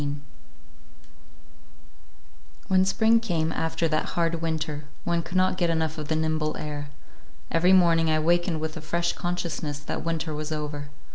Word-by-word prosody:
XVII 145 Hz, 0 st, -2 dB, 2.5 s
WHEN 185 Hz, 0 st, +5 dB
spring 220 Hz, +4 st, +4 dB
came, 165 Hz, -8 st, 0 dB
after 160 Hz, +1 st, 0 dB
that 155 Hz, -1 st, 0 dB
hard 165 Hz, -1 st, +1 dB
winter, 155 Hz, -2 st, -2 dB, 0.2 s
one 170 Hz, -1 st, +1 dB
could 170 Hz, +2 st, -3 dB
not 185 Hz, 0 st, +2 dB
get 175 Hz, -2 st, +2 dB
enough 160 Hz, -1 st, 0 dB
of 150 Hz, -, -5 dB
the 160 Hz, -, 0 dB
nimble 155 Hz, -1 st, 0 dB
air. 145 Hz, -1 st, -5 dB, 0.6 s
Every 180 Hz, +3 st, +4 dB
morning 170 Hz, -3 st, +5 dB
I 155 Hz, -, +3 dB
wakened 170 Hz, +1 st, +2 dB
with 160 Hz, 0 st, -3 dB
a 160 Hz, -, -6 dB
fresh 170 Hz, +2 st, 0 dB
consciousness 175 Hz, -4 st, -3 dB
that 145 Hz, -, -5 dB
winter 165 Hz, -1 st, -2 dB
was 155 Hz, +1 st, -4 dB
over. 150 Hz, -1 st, -4 dB
160 Hz, 155 wpm, -26 LUFS, 155-175 Hz, 2.5 s, WHEN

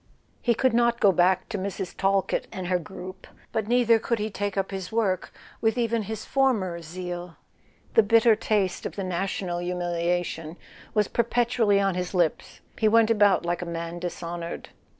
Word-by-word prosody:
He 235 Hz, -1 st, +2 dB
could 260 Hz, +1 st, +2 dB
not 235 Hz, 0 st, +3 dB
go 200 Hz, -, +6 dB
back 180 Hz, +1 st, +2 dB
to 210 Hz, -4 st, -3 dB
Mrs. 190 Hz, -1 st, -4 dB
Talkett 195 Hz, 0 st, +1 dB
and 185 Hz, -, -5 dB
her 180 Hz, 0 st, +1 dB
group; 185 Hz, +2 st, -9 dB, 0.2 s
but 220 Hz, -2 st, -2 dB
neither 235 Hz, -1 st, +4 dB
could 235 Hz, +1 st, -1 dB
he 215 Hz, 0 st, -3 dB
take 205 Hz, 0 st, -3 dB
up 195 Hz, 0 st, -1 dB
his 190 Hz, -2 st, -5 dB
work 210 Hz, -5 st, 0 dB, 0.3 s
with 225 Hz, +1 st, +1 dB
even 230 Hz, -1 st, +1 dB
his 215 Hz, +1 st, -5 dB
former 215 Hz, -11 st, +1 dB
zeal. 175 Hz, +1 st, -6 dB, 0.6 s
The -, -, +7 dB
bitter 225 Hz, +1 st, +5 dB
taste 205 Hz, -4 st, 0 dB
of -, -, -10 dB
the 195 Hz, -, -3 dB
national 185 Hz, -1 st, -2 dB
humiliation 175 Hz, -2 st, -2 dB, 0.4 s
was 210 Hz, -2 st, +3 dB
perpetually 235 Hz, -3 st, +2 dB
on 195 Hz, -1 st, +2 dB
his 180 Hz, +1 st, -3 dB
lips: 175 Hz, -3 st, 0 dB, 0.2 s
he 220 Hz, -, +3 dB
went 225 Hz, +1 st, +5 dB
about 205 Hz, -5 st, +4 dB
like 175 Hz, 0 st, -1 dB
a -, -, -3 dB
man 170 Hz, 0 st, -5 dB
dishonoured. 170 Hz, -1 st, -5 dB
195 Hz, 170 wpm, -26 LUFS, 175-220 Hz, 0.6 s, The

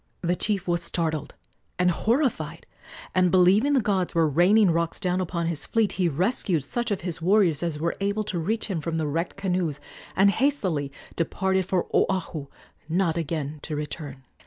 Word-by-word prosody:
The 175 Hz, 0 st, +1 dB
chief 200 Hz, -1 st, -1 dB
was 175 Hz, -1 st, +1 dB
startled 160 Hz, -4 st, -2 dB, 0.4 s
and 180 Hz, 0 st, +3 dB
horrified, 210 Hz, -, 0 dB, 0.5 s
and, 185 Hz, -1 st, +3 dB
believing 190 Hz, +10 st, +4 dB
the 270 Hz, -, +4 dB
gods 190 Hz, -5 st, 0 dB
were 165 Hz, -1 st, +4 dB
raining 180 Hz, +6 st, +4 dB
rocks 165 Hz, 0 st, -1 dB
down 185 Hz, -2 st, 0 dB
upon 170 Hz, -1 st, -2 dB
his 165 Hz, -3 st, -2 dB
fleet, 225 Hz, -3 st, +2 dB
he 180 Hz, -3 st, +1 dB
rescued 175 Hz, -, 0 dB
such 240 Hz, -, -2 dB
of 205 Hz, -, -1 dB
his 175 Hz, -1 st, -5 dB
warriors 185 Hz, -3 st, +3 dB
as 170 Hz, -3 st, -2 dB
were 165 Hz, +3 st, -1 dB
able 200 Hz, +2 st, 0 dB
to 195 Hz, -4 st, -3 dB
reach 215 Hz, +8 st, -1 dB
him 185 Hz, -7 st, -3 dB
from 165 Hz, +1 st, -2 dB
the 160 Hz, -, 0 dB
wrecked 165 Hz, +6 st, -2 dB
canoes, 180 Hz, -6 st, -1 dB, 0.4 s
and 195 Hz, +1 st, +5 dB
hastily 190 Hz, -, 0 dB, 0.2 s
departed 190 Hz, +2 st, 0 dB
for 185 Hz, -2 st, 0 dB
Oahu, 170 Hz, -6 st, 0 dB, 0.4 s
not 170 Hz, -1 st, +1 dB
again 155 Hz, -2 st, -3 dB
to 155 Hz, -, -4 dB
return. 145 Hz, -2 st, -6 dB
175 Hz, 175 wpm, -25 LUFS, 160-195 Hz, 0.5 s, and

